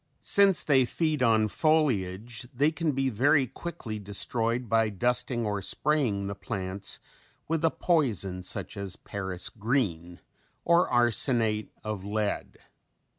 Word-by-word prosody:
Since 195 Hz, -5 st, +4 dB
they 135 Hz, -3 st, +4 dB
feed 155 Hz, +1 st, -1 dB
on 110 Hz, -3 st, +3 dB
foliage 120 Hz, -, 0 dB
they 145 Hz, +5 st, +2 dB
can 160 Hz, -1 st, -1 dB
be 135 Hz, 0 st, 0 dB
very 140 Hz, +5 st, +3 dB
quickly 130 Hz, -4 st, -7 dB
destroyed 115 Hz, +4 st, -1 dB
by 115 Hz, 0 st, +2 dB
dusting 120 Hz, +3 st, 0 dB
or 105 Hz, -1 st, -2 dB
spraying 120 Hz, -4 st, 0 dB
the 100 Hz, -, -3 dB
plants 100 Hz, -1 st, -4 dB, 0.5 s
with 165 Hz, 0 st, -1 dB
a 165 Hz, -, +5 dB
poison 110 Hz, -, 0 dB
such 90 Hz, -, -3 dB
as 100 Hz, -2 st, -2 dB
Paris 95 Hz, -3 st, -4 dB
green 100 Hz, -7 st, -2 dB, 0.5 s
or 170 Hz, +1 st, +4 dB
arsenate 120 Hz, -2 st, +2 dB
of 105 Hz, -3 st, -4 dB
lead. 105 Hz, +1 st, -3 dB
115 Hz, 125 wpm, -28 LUFS, 100-140 Hz, 0.5 s, a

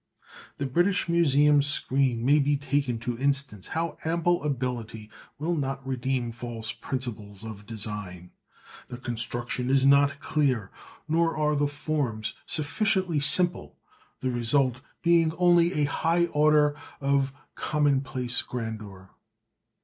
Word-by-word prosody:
The 140 Hz, -, -2 dB
British 175 Hz, +9 st, +1 dB
Museum 150 Hz, -3 st, +4 dB
screen 135 Hz, -4 st, +1 dB
may 145 Hz, +3 st, +5 dB
be 145 Hz, 0 st, +2 dB
taken 140 Hz, -3 st, -1 dB
to 120 Hz, 0 st, -4 dB
instance 140 Hz, -7 st, 0 dB
how 165 Hz, +1 st, -3 dB
ample 170 Hz, +2 st, +1 dB
ability 120 Hz, -6 st, -4 dB, 0.3 s
will 160 Hz, +4 st, -1 dB
not 135 Hz, -2 st, -3 dB
redeem 130 Hz, -2 st, -2 dB
false 115 Hz, -1 st, -5 dB
principles 115 Hz, -5 st, -6 dB
of 105 Hz, -2 st, -9 dB
design: 105 Hz, -5 st, -6 dB, 0.6 s
the 125 Hz, -, -7 dB
construction 120 Hz, +1 st, -3 dB
is 135 Hz, 0 st, +4 dB
not 140 Hz, 0 st, +4 dB
clear, 130 Hz, -12 st, 0 dB, 0.4 s
nor 165 Hz, +1 st, +1 dB
are 150 Hz, -1 st, +1 dB
the 145 Hz, 0 st, +2 dB
forms 145 Hz, -6 st, -2 dB
sufficiently 170 Hz, +1 st, 0 dB
simple, 175 Hz, +5 st, +2 dB, 0.4 s
the 130 Hz, -, 0 dB
result 125 Hz, +1 st, +1 dB, 0.2 s
being 170 Hz, -2 st, +4 dB
only 175 Hz, 0 st, +4 dB
a 150 Hz, -, +1 dB
high 165 Hz, +4 st, +1 dB
order 150 Hz, 0 st, +4 dB, 0.2 s
of 140 Hz, -1 st, +1 dB, 0.2 s
commonplace 135 Hz, -4 st, 0 dB
grandeur. 105 Hz, -5 st, -7 dB
140 Hz, 120 wpm, -27 LUFS, 120-150 Hz, 0.6 s, may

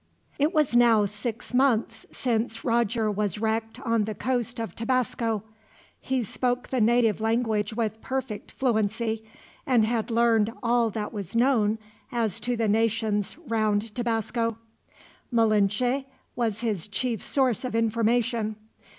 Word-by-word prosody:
It 295 Hz, +3 st, +3 dB
was 300 Hz, -8 st, +2 dB
now 230 Hz, -3 st, +5 dB
six 215 Hz, +4 st, -5 dB
months 235 Hz, -4 st, +1 dB
since 230 Hz, -2 st, -2 dB
Roger 230 Hz, -2 st, +1 dB
was 205 Hz, -2 st, -1 dB
wrecked 225 Hz, +2 st, -2 dB
on 230 Hz, -5 st, +1 dB
the 215 Hz, 0 st, -4 dB
coast 245 Hz, +1 st, -2 dB
of 225 Hz, -6 st, -4 dB
Tabasco, 230 Hz, -3 st, -1 dB, 0.6 s
he 260 Hz, -2 st, -1 dB
spoke 245 Hz, +3 st, -2 dB
the 255 Hz, -3 st, 0 dB
native 225 Hz, -1 st, +3 dB
language 220 Hz, -2 st, 0 dB
with 220 Hz, -1 st, -2 dB
perfect 260 Hz, -5 st, -4 dB
fluency, 225 Hz, -2 st, 0 dB, 0.4 s
and 240 Hz, -5 st, +3 dB
had 225 Hz, 0 st, -1 dB
learned 230 Hz, -2 st, +3 dB
all 235 Hz, -1 st, +3 dB
that 215 Hz, +1 st, -4 dB
was 200 Hz, -1 st, -6 dB
known 230 Hz, -4 st, +3 dB, 0.3 s
as 230 Hz, -5 st, 0 dB
to 245 Hz, -1 st, -1 dB
the 225 Hz, -1 st, +1 dB
nations 220 Hz, 0 st, +1 dB
round 215 Hz, -1 st, 0 dB
Tabasco. 230 Hz, -1 st, -1 dB, 0.7 s
Malinche 225 Hz, +3 st, +2 dB, 0.3 s
was 230 Hz, -3 st, -1 dB
his 210 Hz, -6 st, -1 dB
chief 225 Hz, +2 st, -2 dB
source 260 Hz, -5 st, +1 dB
of 250 Hz, -3 st, -3 dB
information. 230 Hz, 0 st, +1 dB
230 Hz, 135 wpm, -26 LUFS, 215-240 Hz, 0.7 s, now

